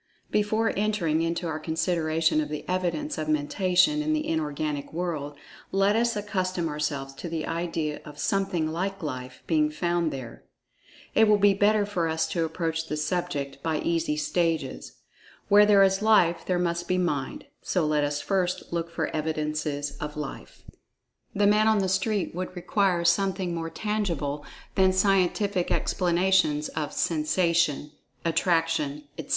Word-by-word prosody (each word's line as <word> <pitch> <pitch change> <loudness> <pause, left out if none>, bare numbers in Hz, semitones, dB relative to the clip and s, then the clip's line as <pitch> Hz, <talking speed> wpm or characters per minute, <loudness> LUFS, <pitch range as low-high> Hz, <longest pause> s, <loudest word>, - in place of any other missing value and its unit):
Before 215 +2 +1
entering 195 -7 +1
into 170 +1 -1
our 155 -1 -3
consideration 160 -1 +1
of 150 - -4
the 150 -1 -6
evidence 175 -4 -1
of 155 0 -3
Mentation 185 - +2
in 310 +1 0
the 305 0 -1
Inorganic 150 -2 -2
world, 155 -4 -3 0.4
let 195 +2 +3
us 235 0 +2
accustom 185 -4 -2
ourselves 145 -2 -3
to 165 +5 -7
the 160 -1 -3
idea 165 -3 -3
of 150 -1 -11
"something 180 -1 0
like 190 +4 -3
Life" 130 -3 -6
being 155 -2 +2
found 170 +1 0
there. 125 -4 -8 0.7
It 220 0 +5
will 210 0 +5
be 205 0 +5
better 205 +1 +3
for 180 -5 -1
us 160 0 0
to 170 - 0
approach 165 0 -2
the 150 - -3
subject 150 -4 -2
by 160 0 -1
easy 165 -2 0
stages. 165 +1 -1 0.6
Where 205 0 +7
there 200 -2 +6
is 195 +1 +2
Life 175 -6 +3
there 180 - +1
must 175 0 -1
be 185 - +1
Mind—so 170 +1 -2
let 150 -1 +1
us 145 0 -1
first 185 -3 -1
look 170 0 -2
for 170 - -3
evidences 150 -2 -2
of 150 0 -6
Life. 150 -2 -7 0.7
The 205 +1 +3
"man 210 +1 +4
on 220 -1 +4
the 195 -2 +1
street" 190 +2 0
would 185 +2 -5
require 180 -1 +1
something 190 0 +1
more 165 -1 -3
tangible 165 -8 -2 0.3
than 190 -1 +4
scientific 195 0 +2
explanations 175 -4 +2
of 150 -2 -3
"sensation," 165 -2 +1 0.3
"attraction," 165 -3 +1 0.2
etc. - - -7
170 Hz, 150 wpm, -26 LUFS, 155-190 Hz, 0.7 s, Where